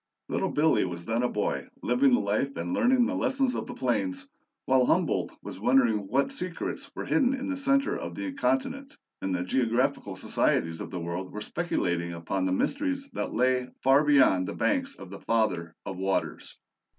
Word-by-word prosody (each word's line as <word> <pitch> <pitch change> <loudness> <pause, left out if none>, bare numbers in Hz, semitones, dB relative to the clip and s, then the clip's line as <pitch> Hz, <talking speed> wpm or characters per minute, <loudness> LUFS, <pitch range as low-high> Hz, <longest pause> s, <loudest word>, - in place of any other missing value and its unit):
"LITTLE - - 0
BILLY" 155 +2 +3
was 85 -1 -6
then 115 +3 0
a 125 - +1
boy, 105 - -2 0.2
living 125 +3 +3
the 125 - +4
life 105 +7 -1
and 260 - -3
learning 255 -1 +4
the 265 - -1
lessons 270 -2 +1
of - - -4
the - - -7
plains, 275 0 -1 0.4
while 130 -1 +4
Humboldt - - +1
was - - -8
wondering 115 -3 +3
what 135 +6 +1
secrets 180 -1 -4
were - - -4
hidden 270 -2 +2
in 270 +2 -4
the 280 - -1
center 275 0 +1
of - - -5
the 290 -1 -4
continent, 275 0 -1 0.2
and 95 -1 -1
the 90 - -1
geographical 120 0 0
societies 80 -3 0
of - - -6
the 90 - -5
world 85 +2 -4
were 105 - -6
speculating 85 - -2
upon 85 +3 -2
the 95 - 0
mysteries 275 - -1
that - - -3
lay 125 0 +1 0.2
far 135 +3 +5
beyond 135 -11 +4
the - - -5
banks 275 -2 0
of 95 - -11
the 100 - -8
"Father 95 -8 0
of 95 - -5
Waters." 95 +1 -2
130 Hz, 185 wpm, -28 LUFS, -, 0.4 s, far